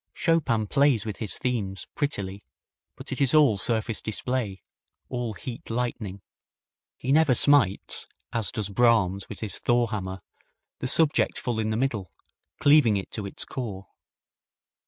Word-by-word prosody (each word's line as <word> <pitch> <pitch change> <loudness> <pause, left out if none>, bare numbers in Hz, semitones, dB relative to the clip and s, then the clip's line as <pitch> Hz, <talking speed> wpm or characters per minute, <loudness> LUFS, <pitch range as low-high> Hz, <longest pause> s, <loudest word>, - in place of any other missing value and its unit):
Chopin 145 - +1
plays 135 -2 +2
with 105 -2 -5
his 110 -4 -1
themes 105 -7 -3
prettily, 100 -9 -3 0.5
but - - -10
it - - -3
is 140 +2 +3
all 140 -10 +5
surface 110 +1 +2
display, 110 -2 -2 0.5
all 120 -3 -3
heat 120 +3 -8
lightning. 115 -5 -3 0.8
He 130 - -2
never 150 -3 +4
smites, 130 -8 +3 0.3
as 110 -5 +1
does 105 -4 -3
Brahms 100 -4 +2
with 100 -3 -8
his 110 - -1
Thor 120 -2 +2
hammer, 95 -3 -5 0.6
the - - -3
subject 155 +3 +2
full 120 -3 -2
in 110 -1 -1
the 110 - -1
middle, 115 -8 -2 0.5
cleaving 145 -8 +5
it 95 - -6
to 105 -3 -4
its - - -1
core. 100 -7 -6
115 Hz, 145 wpm, -26 LUFS, 100-130 Hz, 0.8 s, all